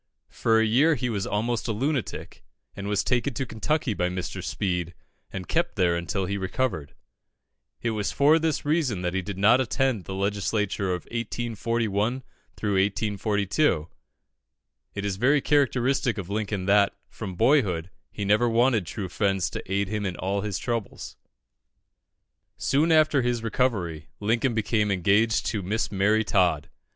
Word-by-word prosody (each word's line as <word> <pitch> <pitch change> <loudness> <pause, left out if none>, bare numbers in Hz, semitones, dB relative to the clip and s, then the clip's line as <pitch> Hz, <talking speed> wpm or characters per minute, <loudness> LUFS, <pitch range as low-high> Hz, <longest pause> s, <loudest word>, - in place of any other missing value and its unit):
For 115 -1 +2
a 110 - +3
year 140 +9 +4
he 125 -2 -2
was 100 -3 -2
almost 115 +3 -1
a - - 0
lunatic, 130 +4 -3 0.3
and 100 0 -6
was 100 -1 +1
taken 125 +1 0
to 135 - -2
Kentucky 125 +2 -1
by 90 -2 0
Mr. 90 0 -5
Speed, 90 +3 -2 0.4
and 95 -3 -6
kept - - 0
there 85 -2 +2
until 85 +3 -2
he 100 +2 -2
recovered. 95 - -2 0.9
It 115 - +1
was 105 -3 -2
for 150 +3 +4
this 160 -2 -1
reason 145 - 0
that 90 0 -1
he 95 - 0
did 100 +1 -6
not 110 +6 +5
attend 130 -4 0
the 95 - -5
Legislature 100 0 -1
of 90 -1 -3
1841 115 0 -1 0.9
42. 100 - +1 1.1
It 100 0 -3
is 100 -2 -2
very 135 +7 +4
characteristic 135 -3 +1
of 100 -1 -6
Lincoln 105 -2 -2
that, 100 0 +3
from 95 -5 -7
boyhood, 95 - +2 0.2
he 100 - -5
never 105 +4 +3
wanted 115 -5 +2
true 95 +5 -4
friends 95 -1 0
to - - -7
aid 100 0 +1
him 105 0 -2
in 90 - -4
all 100 +3 -2
his 105 -3 -3
troubles. 115 -2 -4 1.4
Soon 150 +5 +2
after 155 -3 +4
his 120 -2 -1
recovery, 100 - -1
Lincoln 115 +3 +1
became 110 -1 +1
engaged 100 +4 +2
to 105 - -1
Miss 105 +4 -2
Mary 105 +3 +2
Todd. 90 -9 +1
105 Hz, 155 wpm, -26 LUFS, 95-120 Hz, 1.4 s, not